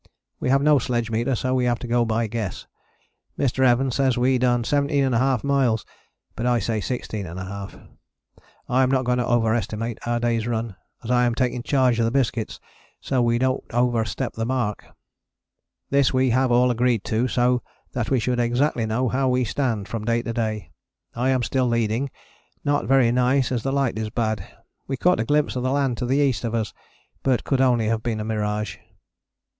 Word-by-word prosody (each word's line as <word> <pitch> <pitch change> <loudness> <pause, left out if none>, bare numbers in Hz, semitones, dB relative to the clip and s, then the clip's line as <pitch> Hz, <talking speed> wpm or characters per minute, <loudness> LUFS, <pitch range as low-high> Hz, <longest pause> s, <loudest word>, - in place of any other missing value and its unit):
We - - -1
have 135 +1 +3
no 150 -1 +5
sledge 120 -2 -2
meter 120 +4 0
so 130 +2 -1
we 130 -1 +1
have 120 -1 +1
to 125 - -7
go 120 0 +2
by 115 +1 0
guess. 110 -4 -4 0.7
Mr. 130 -1 +1
Evans 125 0 +3
says 130 -3 +2
we 125 +1 +2
done 120 -1 +2
17½ 135 -3 +1
miles, 135 -6 +1 0.5
but 120 - -2
I 120 -1 +3
say 110 0 -1
16½. 100 -4 -6 0.8
I 125 +2 +2
am 130 - +3
not 130 -1 +1
going 125 0 +1
to 120 - -1
over 115 -2 +2
estimate 115 +1 -3
our 120 0 +1
day's 115 -1 0
run, 115 -3 -2 0.3
as 115 - -3
I 125 0 +4
am 120 -1 0
taking 125 -1 0
charge 125 -2 +2
of 115 - +3
the - - +2
biscuits 120 -3 -1 0.4
so 135 - -2
that - - +4
we 120 0 +2
dont 130 +2 0
over 120 -1 +2
step 110 +4 -4
the 115 - -3
mark. 120 -4 -2 1.0
This 140 -1 +3
we 130 -1 +2
have 130 +1 +2
all 125 +1 +4
agreed 120 -3 +1
to 115 +3 0
so 125 0 +2 0.3
that 115 -3 -2
we 130 - +2
should 125 +1 -1
exactly 120 0 +1
know 120 +4 0
how 130 +2 +1
we 125 0 +2
stand, 115 -4 -1
from 115 -2 -4
day 115 0 +1
to 115 - -4
day. 110 -2 -3 0.4
I 125 +3 0
am 130 -2 +2
still 130 +2 +1
leading, 115 +3 0 0.6
not 145 0 +1
very 130 -3 +4
nice 125 +2 +2
as 120 -2 0
the 135 - -2
light 135 -5 0
is 110 -1 -3
bad. 110 -4 -2 0.4
We 135 - -2
caught 180 +6 +3
a 115 - 0
glimpse 150 +2 +1
of 125 - -1
the 130 - 0
land 135 -3 0
to 125 - -2
the 135 +3 +2
east 135 -7 +1
of 115 -1 -2
us, 110 -2 -2 0.5
but 130 -3 +1
could 135 -2 +1
only 120 -4 +3
have 110 0 0
been 110 -1 -2
a 105 - -3
mirage. 105 -1 -2
120 Hz, 200 wpm, -23 LUFS, 115-130 Hz, 1.0 s, no